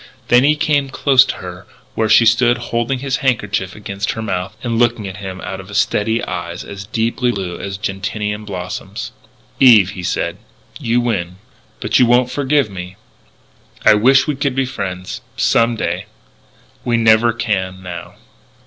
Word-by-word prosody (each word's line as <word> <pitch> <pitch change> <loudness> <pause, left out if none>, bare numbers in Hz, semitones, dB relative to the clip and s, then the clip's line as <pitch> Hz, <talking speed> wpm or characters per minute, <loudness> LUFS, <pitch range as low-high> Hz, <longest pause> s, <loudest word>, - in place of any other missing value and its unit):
Then 120 +1 +6
he 150 +2 +4
came 145 -2 +1
close 135 -1 +5
to - - -3
her 90 -1 -9 0.3
where 110 -1 0
she 115 - +6
stood 120 +1 +4 0.2
holding 120 +3 0
his 135 +1 -2
handkerchief 105 -8 -1
against 100 0 -3
her 110 - -5
mouth 95 0 -3
and 115 -2 -1
looking 120 -3 +1
at 95 +1 -7
him 95 -2 -7
out 95 - -5
of 100 +2 -6
steady 110 +2 +1
eyes 85 0 -5
as 100 0 -9
deeply 115 +3 0
blue 95 -5 -5
as 95 -1 -5
gentian 105 +2 -3
blossoms. 90 - -6 0.5
"Eve," 110 -8 +7
he 90 - -7
said, 90 - -2 0.4
"you 120 +1 +1
win. 90 -7 -2 0.4
But - - +1
you 125 - +5
won't 125 +1 +3
forgive 140 0 +1
me.... 90 -2 -8 0.9
I - - +8
wish 130 +6 +5
we 150 - -1
could 140 -1 -1
be 135 0 +1
friends, 95 -7 -5 0.2
some 115 0 +3
day.... 90 -1 -3 0.8
We 120 -1 +1
never 115 +1 +4
can, 95 -5 -2
now.... 90 -1 -8
110 Hz, 165 wpm, -18 LUFS, 95-120 Hz, 0.9 s, I